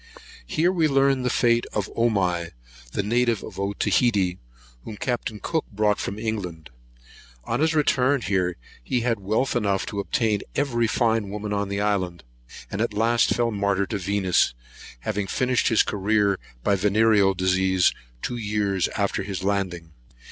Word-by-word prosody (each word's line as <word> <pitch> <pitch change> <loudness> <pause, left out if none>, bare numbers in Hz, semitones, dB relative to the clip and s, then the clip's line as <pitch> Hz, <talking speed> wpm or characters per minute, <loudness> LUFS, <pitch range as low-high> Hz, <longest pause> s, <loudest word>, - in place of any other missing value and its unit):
Here 165 - +2
we 165 -4 +2
learned 135 -2 +2
the 125 - +1
fate 120 -1 +2
of 105 -1 -1
Omai, 90 -7 +1 0.4
the 100 - -1
native 120 +1 +1
of - - -9
Otaheite, 100 -1 +1 0.4
whom 105 - -8
Captain 115 -3 -3
Cook 160 +6 -2
brought 105 0 +1
from 100 - -4
England. 95 - -4 0.7
On 115 - -2
his 160 +1 +2
return 140 -2 +2
here 90 -4 0 0.3
he 125 - 0
had 115 -2 0
wealth 110 +8 0
enough 100 -5 +1
to 100 - -4
obtain 105 0 0
every 120 -5 +1
fine 110 -3 +1
woman 105 +1 -4
on 100 -1 -1
the 100 0 -2
island; 95 -5 -1 0.5
and 100 - -2
at 115 - -1
last 115 +2 +2
fell 120 -1 +1
a - - -4
martyr 100 -1 0
to 100 +1 -4
Venus, 95 -7 +1 0.5
having 100 +9 -2
finished 125 +4 +1
his 115 - +4
career 100 -1 +1 0.2
by 100 - +2
the 100 +1 +2
venereal 105 -2 +4
disease, 95 0 +2 0.3
two 120 - -3
years 105 -4 0
after 100 -1 0
his 95 -2 -5
landing. 95 -4 -2
105 Hz, 160 wpm, -24 LUFS, 95-120 Hz, 0.7 s, his